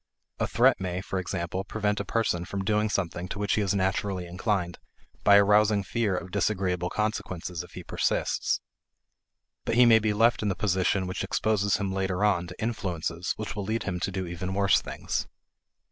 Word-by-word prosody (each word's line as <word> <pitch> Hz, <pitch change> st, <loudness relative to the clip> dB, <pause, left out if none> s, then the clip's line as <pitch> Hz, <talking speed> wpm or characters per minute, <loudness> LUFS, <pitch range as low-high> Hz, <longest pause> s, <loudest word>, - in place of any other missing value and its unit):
A -, -, +1 dB
threat -, -, +3 dB
may, 90 Hz, -1 st, -2 dB
for 95 Hz, 0 st, -3 dB
example, 90 Hz, 0 st, -3 dB
prevent 105 Hz, 0 st, -1 dB
a -, -, -1 dB
person 110 Hz, -7 st, 0 dB
from 95 Hz, +2 st, -4 dB
doing 105 Hz, +1 st, +2 dB
something 90 Hz, -3 st, -2 dB
to 95 Hz, -, -6 dB
which 105 Hz, 0 st, 0 dB
he 110 Hz, -, +2 dB
is 100 Hz, 0 st, 0 dB
naturally 95 Hz, -1 st, -1 dB
inclined 90 Hz, 0 st, -2 dB, 0.4 s
by 100 Hz, -1 st, +7 dB
arousing 105 Hz, 0 st, +4 dB
fear 105 Hz, -1 st, 0 dB
of 90 Hz, 0 st, -6 dB
disagreeable 90 Hz, -3 st, 0 dB
consequences 95 Hz, -5 st, -3 dB
if 90 Hz, -, -13 dB
he -, -, -8 dB
persists. -, -, 0 dB, 1.0 s
But 115 Hz, -, -1 dB
he 125 Hz, +1 st, +7 dB
may 115 Hz, -1 st, +7 dB
be 110 Hz, -1 st, 0 dB
left 115 Hz, +3 st, +3 dB
in 105 Hz, -, 0 dB
the 95 Hz, -, -1 dB
position 95 Hz, 0 st, +1 dB
which 90 Hz, +1 st, -3 dB
exposes 105 Hz, -3 st, +1 dB
him 100 Hz, -2 st, -2 dB
later 95 Hz, 0 st, -1 dB
on 90 Hz, -4 st, +1 dB
to 90 Hz, -, -11 dB
influences 90 Hz, -6 st, -2 dB
which 105 Hz, -1 st, -5 dB
will 105 Hz, -, -3 dB
lead 110 Hz, +3 st, -2 dB
him 90 Hz, -2 st, -3 dB
to -, -, -1 dB
do 95 Hz, 0 st, -3 dB
even 90 Hz, +2 st, -4 dB
worse 100 Hz, -1 st, +4 dB
things. -, -, -3 dB
95 Hz, 190 wpm, -27 LUFS, 90-105 Hz, 1.0 s, by